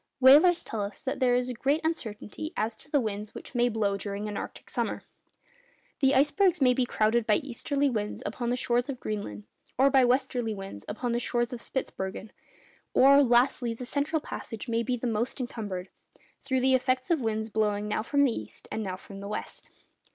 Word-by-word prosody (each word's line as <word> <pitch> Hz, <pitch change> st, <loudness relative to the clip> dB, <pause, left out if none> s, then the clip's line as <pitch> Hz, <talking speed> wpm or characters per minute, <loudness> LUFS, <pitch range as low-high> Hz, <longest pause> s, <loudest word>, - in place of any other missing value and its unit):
Whalers 295 Hz, +7 st, +7 dB
tell 220 Hz, -, -4 dB
us 200 Hz, 0 st, -5 dB
that 265 Hz, -, -2 dB
there 250 Hz, -2 st, +3 dB
is 250 Hz, 0 st, 0 dB
great 275 Hz, +6 st, +1 dB
uncertainty 310 Hz, -1 st, -4 dB
as 220 Hz, +1 st, -1 dB
to 285 Hz, -, -13 dB
the 290 Hz, -, +3 dB
winds 210 Hz, -2 st, -4 dB
which -, -, -9 dB
may 245 Hz, -1 st, +3 dB
blow 210 Hz, -3 st, 0 dB
during 200 Hz, +1 st, -4 dB
an 210 Hz, -, -5 dB
arctic -, -, -7 dB
summer. -, -, -2 dB, 1.0 s
The 270 Hz, -1 st, +4 dB
icebergs 335 Hz, +7 st, +3 dB
may 255 Hz, -3 st, +5 dB
be 250 Hz, -1 st, 0 dB
crowded 220 Hz, 0 st, +1 dB
by 210 Hz, -, +5 dB
easterly 280 Hz, +2 st, -1 dB
winds 210 Hz, -5 st, -2 dB
upon 235 Hz, +3 st, -3 dB
the 245 Hz, -, +1 dB
shores 245 Hz, +1 st, 0 dB
of 260 Hz, -3 st, -4 dB
Greenland, 155 Hz, -, -5 dB, 0.3 s
or 275 Hz, +2 st, +5 dB
by 265 Hz, -1 st, +5 dB
westerly 245 Hz, -3 st, +1 dB
winds 195 Hz, -, -8 dB
upon 235 Hz, +3 st, -3 dB
the 235 Hz, -, +1 dB
shores 240 Hz, 0 st, -1 dB
of 240 Hz, -, -6 dB
Spitzbergen, 195 Hz, -5 st, -4 dB, 0.6 s
or, 280 Hz, +2 st, +7 dB
lastly, 240 Hz, -2 st, +3 dB
the 250 Hz, -, -7 dB
central 285 Hz, +5 st, 0 dB
passage 225 Hz, -5 st, -7 dB
may 230 Hz, 0 st, +1 dB
be 245 Hz, +1 st, -1 dB
the 245 Hz, -, -5 dB
most 235 Hz, +4 st, -1 dB
encumbered, 205 Hz, -7 st, -5 dB, 0.5 s
through 260 Hz, -2 st, -1 dB
the 260 Hz, +1 st, +3 dB
effects 255 Hz, +2 st, +1 dB
of 320 Hz, -5 st, +2 dB
winds 220 Hz, -1 st, -1 dB
blowing 210 Hz, -1 st, 0 dB
now 210 Hz, -, 0 dB
from 285 Hz, +5 st, +2 dB
the 270 Hz, -, +4 dB
east 105 Hz, +1 st, -8 dB
and 220 Hz, -, -2 dB
now 190 Hz, -3 st, -3 dB
from 195 Hz, +1 st, -11 dB
the 200 Hz, -, -7 dB
west. 210 Hz, -, -6 dB
240 Hz, 195 wpm, -28 LUFS, 215-265 Hz, 1.0 s, Whalers